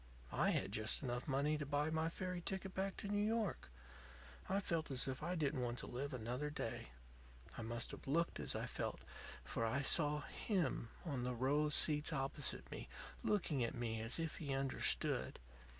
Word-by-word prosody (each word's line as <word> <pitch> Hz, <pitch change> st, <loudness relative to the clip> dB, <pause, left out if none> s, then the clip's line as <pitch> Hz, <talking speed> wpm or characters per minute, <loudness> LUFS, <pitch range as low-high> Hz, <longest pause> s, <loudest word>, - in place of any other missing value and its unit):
"I -, -, +4 dB
had -, -, +1 dB
just 110 Hz, +6 st, 0 dB
enough 125 Hz, -1 st, -2 dB
money 145 Hz, +2 st, +2 dB
to -, -, -1 dB
buy 145 Hz, +2 st, +1 dB
my 160 Hz, +1 st, +2 dB
ferry 180 Hz, +1 st, -3 dB
ticket 190 Hz, 0 st, -3 dB
back 195 Hz, 0 st, -1 dB
to -, -, -4 dB
New 205 Hz, 0 st, +2 dB
York. 215 Hz, -, 0 dB, 0.8 s
I 195 Hz, +1 st, +3 dB
felt 165 Hz, -5 st, 0 dB
as 130 Hz, -1 st, +2 dB
if 130 Hz, 0 st, -2 dB
I 175 Hz, +4 st, -1 dB
didn't 145 Hz, -4 st, +1 dB
want 120 Hz, 0 st, -1 dB
to -, -, -2 dB
live 140 Hz, +4 st, -3 dB
another 125 Hz, +3 st, -2 dB
day. 150 Hz, -, -3 dB, 0.7 s
I -, -, -4 dB
must 115 Hz, +1 st, -1 dB
have -, -, -9 dB
looked 165 Hz, +5 st, +2 dB
as -, -, -1 dB
I -, -, -1 dB
felt, -, -, -3 dB, 0.4 s
for -, -, -2 dB
I 130 Hz, +5 st, +1 dB
saw 150 Hz, +1 st, +3 dB
him 180 Hz, -, 0 dB, 0.2 s
on 140 Hz, -7 st, -1 dB
the 125 Hz, 0 st, -1 dB
row 140 Hz, +5 st, +3 dB
of 150 Hz, -, +2 dB
seats 150 Hz, +1 st, +5 dB
opposite 135 Hz, 0 st, 0 dB
me, -, -, -6 dB, 0.3 s
looking 160 Hz, -10 st, +2 dB
at 115 Hz, -, -1 dB
me 115 Hz, -2 st, -1 dB
as 115 Hz, +2 st, -1 dB
if 165 Hz, -2 st, -2 dB
he 140 Hz, -4 st, -1 dB
understood. 135 Hz, 0 st, +2 dB
145 Hz, 190 wpm, -40 LUFS, 125-165 Hz, 0.8 s, seats